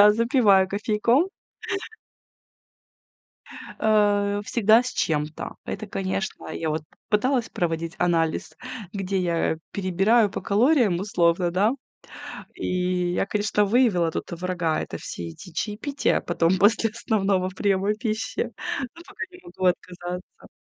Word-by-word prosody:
Да, 210 0 +8
запиваю 220 -5 +4
кофейком. 220 - +2 2.5
Э, 205 -1 +3
всегда 225 +1 +4
с 250 - -3
чем-то. 150 -5 -2
Это, 215 - -5
конечно, 190 0 -3
я 160 - -3
вот 155 0 -2 0.3
пыталась 240 +3 +1
проводить 165 0 -2
анализ, 165 -2 0 0.4
где 195 -1 -1
я 170 -2 0
перебираю 200 +4 +3
по - - -4
калориям 220 - +3
условно, 175 -3 +2
да. 200 +5 +3 0.8
И 180 -1 -1
я, - - +1
конечно, 205 0 +1
выявила 200 -7 +3
тут - - -5
врага: 175 -2 -1
это - - -5
все 85 -1 -6
эти 160 - -11
чаепития 220 - -1
потом 175 +1 +1
после 220 +2 +4
основного 195 -5 0
приема 195 +1 +1
пищи, 220 -1 -2 0.4
но 335 - -12
пока 395 - -7
не 360 - -14
могу 350 - -5
отказаться. 180 0 -3
195 Hz, 120 wpm, -25 LUFS, 175-215 Hz, 2.5 s, Да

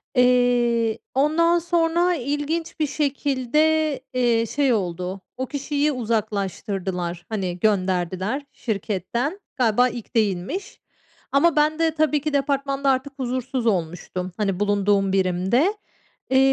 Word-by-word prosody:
Eee, 245 -2 +3
ondan 335 +5 +3
sonra 345 +1 +2
ilginç 295 +5 -3
bir 305 - +2
şekilde, 290 +2 +1 0.2
eee, 235 -2 +2
şey 275 +1 +1
oldu, 185 -1 -3 0.2
o 260 - -2
kişiyi 285 +2 -1
uzaklaştırdılar. 195 -6 -2
Hani, 185 -5 -3
gönderdiler 190 +4 0
şirketten. 225 - -3 0.2
Galiba 245 0 +3
ilk 235 0 -9
değilmiş 210 - -1 0.5
ama 290 +4 +4
ben 305 +1 +2
de 325 -1 +3
tabii 300 -2 +2
ki 305 0 -2
departmanda 275 0 0
artık 270 +1 0
huzursuz 255 -1 -2
olmuştum. 180 -1 -2
Hani, 195 -3 -1
bulunduğum 200 -1 +2
birimde. 190 - +2 0.6
Eee, 265 - +4
245 Hz, 115 wpm, -23 LUFS, 200-290 Hz, 0.6 s, ama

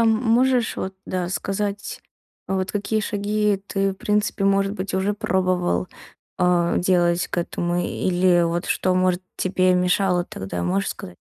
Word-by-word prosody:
м 230 - +4
можешь 240 +2 +2
вот, 190 0 -4
да, 180 -1 -2
сказать, 200 +2 -3 0.5
вот 190 0 -1
какие 210 +1 -1
шаги 210 -1 0
ты, 195 0 0
в - - -10
принципе, 210 +1 -1
может 195 0 +2
быть, 190 -2 -4
уже 190 +2 0
пробовал, 185 - 0 0.5
а, 175 -1 +2
делать 175 -1 +2
к - - -2
этому 175 0 -2
или 180 0 +2
вот 170 +2 -1
что, 185 - +1
может, 185 0 +1
тебе 185 0 +2
мешало 180 0 +2
тогда, 95 - -6
можешь 95 +3 0
сказать? 90 0 -8
185 Hz, 150 wpm, -23 LUFS, 175-205 Hz, 0.5 s, м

